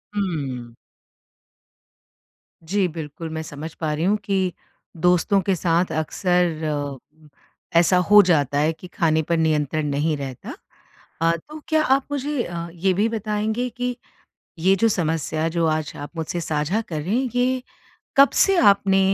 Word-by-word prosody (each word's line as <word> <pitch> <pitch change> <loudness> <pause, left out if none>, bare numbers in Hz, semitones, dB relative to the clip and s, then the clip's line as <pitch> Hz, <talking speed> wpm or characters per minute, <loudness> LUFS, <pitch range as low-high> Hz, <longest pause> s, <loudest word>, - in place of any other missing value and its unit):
हुँ। 135 - -3 1.9
जी 195 0 +1
बिल्कुल, 160 0 -7
मैं 160 0 -4
समझ 155 +1 -8
पा 155 -2 -2
रही 160 +3 -1
हूँ 210 +2 +3
कि 190 -3 0 0.4
दोस्तों 180 +4 +3
के 190 0 0
साथ 170 0 +1
अक्सर, 155 -4 -1 0.8
ऐसा 175 +2 +4
हो 210 0 +9
जाता 145 -5 +2
है 155 +2 +2
कि 180 - -12
खाने 160 -1 +2
पर 170 - +2
नियंत्रण 155 -1 0
नहीं 150 +2 0
रहता। 135 -3 -7 0.7
अ, 165 0 +4 0.2
तो 305 - -8
क्या 315 -1 +2
आप 270 -1 +2
मुझे 285 -2 -1
अ, 170 -1 -5
ये 185 +2 +1
भी 205 +4 +2
बताएँगे 220 +2 -2
कि, 245 +1 -3 0.6
ये 190 +4 +4
जो 225 +4 +3
समस्या 160 -3 -1
जो 170 0 0
आज 155 -1 -1
आप 145 - -7
मुझसे 165 +2 -3
साझा 160 +7 -1
कर 165 -9 -5
रहे 185 +8 -1
हैं, 255 0 0
ये 255 +1 +1 0.5
कब 275 0 +7
से 390 -1 +2
आपने 200 - +4
170 Hz, 150 wpm, -22 LUFS, 155-205 Hz, 1.9 s, हो